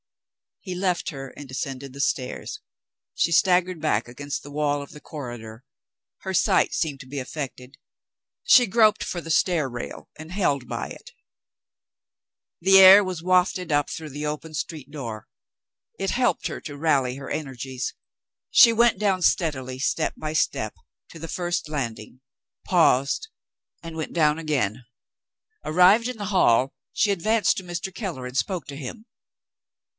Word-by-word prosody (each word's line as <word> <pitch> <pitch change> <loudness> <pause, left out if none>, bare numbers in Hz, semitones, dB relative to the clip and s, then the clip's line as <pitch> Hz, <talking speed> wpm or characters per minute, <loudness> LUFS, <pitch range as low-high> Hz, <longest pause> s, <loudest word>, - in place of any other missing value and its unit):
He 185 - -6
left 180 -1 -1
her, 135 -3 -7
and 145 +2 -11
descended 135 +1 -5
the 140 - -11
stairs. 130 -1 -2 0.6
She 170 - +1
staggered 180 +1 +3
back 120 -8 0
against 135 +2 -5
the 145 - -10
wall 145 -1 0
of 140 - -10
the 150 - -11
corridor. 120 -6 -8 0.6
Her 190 - -5
sight - - +3
seemed 150 -5 -1
to 135 - -11
be 140 +1 -5
affected. 130 -1 -7 0.7
She 255 - +7
groped 215 +1 +4
for 175 - -4
the 165 - -5
stair 160 -3 +2
rail, 120 -1 -7
and 160 +1 -9
held 145 -10 0
by - - -4
it. - - -11 1.5
The 195 +2 +7
air 190 +2 +10
was 185 -3 -5
wafted 180 -1 +2
up 145 -1 +2
through 155 -1 -6
the 145 +2 -5
open 150 +1 -5
street 155 -3 -5
door. 115 -8 -7 0.7
It 195 - -1
helped 245 0 +1
her - - -4
to 145 -2 -8
rally 140 -5 +1
her 135 0 -8
energies. 130 -3 -4 0.5
She 230 -2 +7
went 235 -3 +3
down 195 -3 +1
steadily, 130 -8 0
step 155 +3 0
by 155 0 -5
step, 110 -7 0 0.3
to - - -12
the 165 - -6
first 175 -2 -2
landing 125 -4 -5 0.4
paused, 165 - +2 0.5
and 165 -1 -8
went 160 -1 -5
down 155 -2 +3
again. 130 -8 -1 0.8
Arrived 185 +8 +5
in 250 -2 -5
the 205 - -5
hall, 135 - +3 0.2
she 205 - +2
advanced 215 +4 +2
to 190 - -4
Mr. 175 +1 -5
Keller, 180 - -5
and 125 +1 -6
spoke 180 -2 -1
to 140 - -7
him. 155 - -8
155 Hz, 155 wpm, -24 LUFS, 135-185 Hz, 1.5 s, air